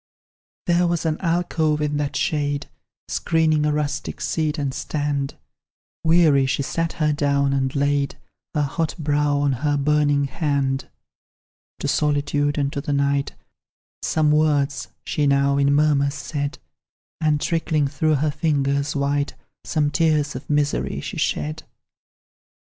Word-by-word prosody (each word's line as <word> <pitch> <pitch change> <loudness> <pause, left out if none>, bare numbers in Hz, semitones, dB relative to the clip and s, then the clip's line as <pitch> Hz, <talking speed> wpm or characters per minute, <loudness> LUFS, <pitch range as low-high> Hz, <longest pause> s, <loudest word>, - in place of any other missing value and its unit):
There 175 0 +3
was 170 -1 -1
an 155 -1 0
alcove 165 -3 +1
in 150 -1 -1
that 145 -1 -2
shade, 145 -5 -1 0.4
Screening 155 -2 +1
a - - +2
rustic 150 -1 -2
seat 155 -1 -1
and 140 -2 -2
stand; 145 -1 -2 0.7
Weary 160 -5 +4
she 140 - 0
sat 165 +4 -2
her 150 -2 +1
down, 140 -1 +1
and 130 0 0
laid 140 0 +1 0.4
Her 150 - +2
hot 155 +3 -2
brow 145 -2 +1
on 145 0 +2
her 145 -1 +1
burning 145 0 +2
hand. 140 -2 -1 0.9
To - - -1
solitude 145 0 +1
and 140 -1 0
to 140 - -2
the 145 - -2
night, 140 0 0 0.7
Some 155 -1 +2
words 145 -2 +1 0.2
she 145 -1 0
now, 140 0 +3
in 140 0 +3
murmurs, 145 -1 +3
said; 140 +1 -4 0.6
And 155 -2 +2
trickling 160 -2 0
through 150 +3 +1
her 150 +2 +1
fingers 140 -2 0
white, 140 0 0 0.3
Some 150 -3 0
tears 150 -1 +1
of 125 - -8
misery 145 -1 0
she - - -6
shed. 75 0 -1
145 Hz, 140 wpm, -22 LUFS, 140-155 Hz, 0.9 s, Weary